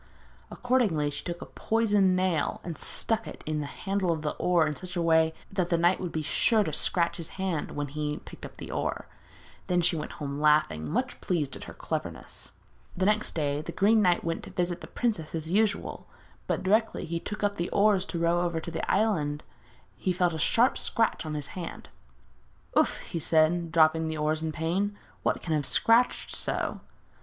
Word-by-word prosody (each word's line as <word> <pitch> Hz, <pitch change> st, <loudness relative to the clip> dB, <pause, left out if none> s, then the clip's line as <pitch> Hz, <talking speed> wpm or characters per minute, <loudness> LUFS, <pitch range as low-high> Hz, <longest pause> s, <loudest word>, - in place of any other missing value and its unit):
Accordingly 210 Hz, -, +1 dB
she 145 Hz, -, -6 dB
took 175 Hz, -1 st, -5 dB
a -, -, -8 dB
poisoned 205 Hz, -4 st, +2 dB
nail 185 Hz, -4 st, 0 dB
and 170 Hz, -2 st, -5 dB
stuck 225 Hz, +8 st, -1 dB
it -, -, -9 dB
in 155 Hz, 0 st, -1 dB
the 145 Hz, -, -4 dB
handle 195 Hz, +2 st, -1 dB
of 160 Hz, -2 st, -2 dB
the 150 Hz, -, 0 dB
oar 175 Hz, -3 st, +3 dB
in 150 Hz, -1 st, -2 dB
such 180 Hz, +2 st, -7 dB
a 175 Hz, -, 0 dB
way 160 Hz, -1 st, +4 dB, 0.2 s
that 185 Hz, -3 st, -1 dB
the 170 Hz, -, +3 dB
knight 175 Hz, +2 st, +3 dB
would 180 Hz, -2 st, -4 dB
be 155 Hz, -, -2 dB
sure 220 Hz, -, +3 dB
to -, -, -4 dB
scratch 170 Hz, -1 st, +2 dB
his 170 Hz, -2 st, -5 dB
hand 185 Hz, -5 st, -2 dB
when 145 Hz, 0 st, -2 dB
he 150 Hz, +1 st, -3 dB
picked -, -, -13 dB
up -, -, -9 dB
the -, -, -7 dB
oar. -, -, -2 dB, 0.6 s
Then 180 Hz, -1 st, +2 dB
she 170 Hz, 0 st, +2 dB
went 150 Hz, -, -4 dB
home 140 Hz, -1 st, -5 dB
laughing, 150 Hz, -, +3 dB
very -, -, -5 dB
much -, -, -1 dB
pleased 150 Hz, -7 st, -1 dB
with -, -, -6 dB
her -, -, -10 dB
cleverness. -, -, -5 dB, 0.4 s
The 185 Hz, -, +1 dB
next 210 Hz, +1 st, +1 dB
day 145 Hz, -2 st, 0 dB
the -, -, -6 dB
Green 215 Hz, +2 st, +4 dB
Knight 180 Hz, -3 st, +3 dB
went 165 Hz, -1 st, -2 dB
to -, -, -9 dB
visit 175 Hz, 0 st, -2 dB
the -, -, -8 dB
princess 200 Hz, -11 st, -2 dB
as 160 Hz, 0 st, -4 dB
usual; 205 Hz, +1 st, 0 dB, 0.4 s
but -, -, -1 dB
directly 215 Hz, +4 st, +2 dB
he 170 Hz, +1 st, -2 dB
took 210 Hz, +4 st, -6 dB
up 205 Hz, 0 st, +1 dB
the 170 Hz, -, -1 dB
oars 200 Hz, -2 st, +3 dB
to 170 Hz, -, -4 dB
row 170 Hz, +1 st, +2 dB
over 170 Hz, -2 st, 0 dB
to 170 Hz, -, -6 dB
the 165 Hz, 0 st, -3 dB
island 160 Hz, -9 st, +1 dB, 0.5 s
he 185 Hz, -, -1 dB
felt 180 Hz, -1 st, +1 dB
a 160 Hz, -, -4 dB
sharp 235 Hz, +10 st, +3 dB
scratch 225 Hz, -7 st, 0 dB
on 155 Hz, -, -3 dB
his 145 Hz, -2 st, -4 dB
hand. 175 Hz, -3 st, -7 dB, 0.9 s
'Oof!' -, -, +3 dB
he 170 Hz, -, -5 dB
said, 165 Hz, +2 st, +2 dB
dropping 160 Hz, 0 st, +4 dB
the 160 Hz, 0 st, -3 dB
oars 155 Hz, +1 st, +1 dB
from 160 Hz, 0 st, -2 dB
pain, 185 Hz, +6 st, -1 dB, 0.2 s
'what -, -, 0 dB
can 165 Hz, -, -1 dB
have 150 Hz, -1 st, +1 dB
scratched 230 Hz, -, +3 dB
so?' -, -, -2 dB
170 Hz, 205 wpm, -28 LUFS, 155-195 Hz, 0.9 s, way